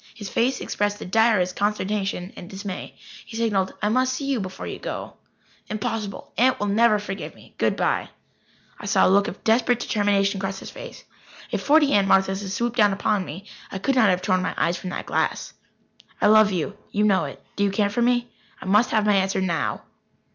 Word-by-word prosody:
His 205 -3 -7
face 250 +6 0
expressed 205 0 -1
the - - -8
direst 205 -3 +2
consternation 200 -2 -2
and 175 - -10
dismay. 195 -1 -7 0.3
He 225 - -9
signalled: 205 -5 0
"I 210 - +3
must 255 +3 +2
see 275 +2 -4
you 275 -3 0
before 190 -1 -6
you - - -6
go." - - -6 0.6
"Impossible. 215 -1 -4
Aunt 255 +2 +4
will 205 - -1
never 215 +2 +4
forgive 200 -1 -6
me. - - -18
Good - - +2
bye." - - 0 0.7
I 205 - -7
saw 200 -1 +4
a - - +4
look 200 +1 +4
of 195 - -7
desperate 240 +2 +3
determination 200 -3 +1
cross 195 0 -3
his - - -9
face. - - -10 0.5
If - - -1
forty 295 -1 +4
Aunt 200 -1 +4
Marthas 190 0 +3
had 195 - -5
swooped 235 +4 -2
down 205 -3 +5
upon 205 0 0
me, 180 +4 -8 0.3
I - - -4
could 270 +8 0
not 235 -5 +4
have 180 0 +1
torn 185 0 +2
my - - -2
eyes 170 +1 +1
from 185 - -6
that - - -5
glass. - - -1 0.7
"I - - +2
love 215 0 +6
you. 185 +2 -2
You 210 - 0
know 190 -5 +3
it. 140 - -8 0.2
Do 205 - 0
you 200 - +3
care 200 +1 0
for 240 - -1
me? 240 0 +1 0.3
I - - -10
must 210 +5 +4
have 215 -2 +1
my 210 - +4
answer 195 0 +1
now." 175 -4 -1
205 Hz, 210 wpm, -24 LUFS, 190-225 Hz, 0.7 s, love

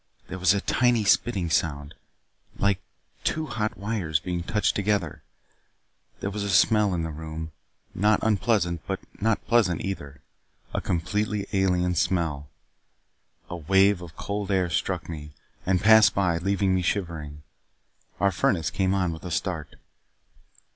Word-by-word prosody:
There 95 - -5
was 90 +2 +4
a 100 - 0
tiny 120 -1 +2
spitting 100 -4 +2
sound, 75 -2 -1 0.6
like 100 -2 +1 0.4
two 160 0 0
hot 110 -6 -3
wires 95 -6 -1
being 90 -1 -3
touched 105 +4 0
together. 100 -5 -1 1.0
There 100 - -2
was 105 +1 -4
a 100 - -2
smell 105 0 +4
in 85 - -1
the 80 - -3
room, 80 +1 -6 0.4
not 105 +3 +3
unpleasant 105 -6 +1
but 95 -1 -2 0.2
not 110 0 +1
pleasant 105 -9 +2
either 70 -8 -6 0.5
a - - -1
completely 105 +4 -1
alien 90 -2 +2
smell. 80 -5 -1 1.0
A 90 - -5
wave 95 +3 +3
of 85 -3 -10
cold 100 -1 -4
air 95 -3 +1
struck - - -1
me, 75 -3 -8 0.3
and 95 -1 +2
passed 110 -1 +7
by, 85 -4 +1
leaving 95 +1 +1
me 95 - +1
shivering. 80 -6 -3 0.8
Our 100 -1 +3
furnace 85 -2 +1
came 95 0 +1
on 90 -3 0
with 80 - -10
a 90 - -5
start. 80 -3 -3
95 Hz, 145 wpm, -26 LUFS, 85-100 Hz, 1.0 s, passed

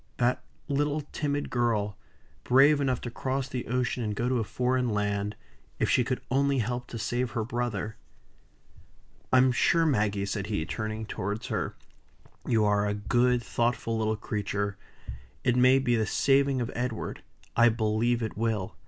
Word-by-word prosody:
That 125 +1 +1 0.3
little 145 +1 0
timid 145 -1 -2
girl 110 -4 0 0.5
brave 140 +3 +5
enough 130 -3 0
to 120 - -5
cross 130 +2 -2
the 130 -3 -5
ocean 125 0 -1
and 105 -1 -2
go 120 +4 -1
to 125 -1 +1
a - - 0
foreign 125 +4 0
land, 105 -1 -1 0.4
if - - +1
she 125 - +4
could 125 +1 -2
only 140 +1 +2
help 120 +1 -2
to 115 - -6
save 120 +3 -1
her 115 - -1
brother! 110 -2 -3 1.3
"I'm 130 0 +5
sure 165 +6 +3
Maggie," 105 -8 +1
said 100 0 -3
he, 100 -7 -1
turning 110 +2 -4
towards 105 +2 -4
her, - - -2 0.7
"you 110 -2 +3
are 105 0 +2
a 105 - -1
good, 120 +3 +2
thoughtful 115 -1 -1
little 110 -1 0
creature. 100 -1 -2 0.7
It 125 -1 +2
may 130 +1 +6
be 120 -3 +2
the 110 -2 +1
saving 135 0 +2
of 120 - -3
Edward 125 -2 -3 0.3
I 120 0 +6
believe 115 +1 +1
it 110 - -4
will. 110 -4 -1
120 Hz, 160 wpm, -28 LUFS, 105-125 Hz, 1.3 s, may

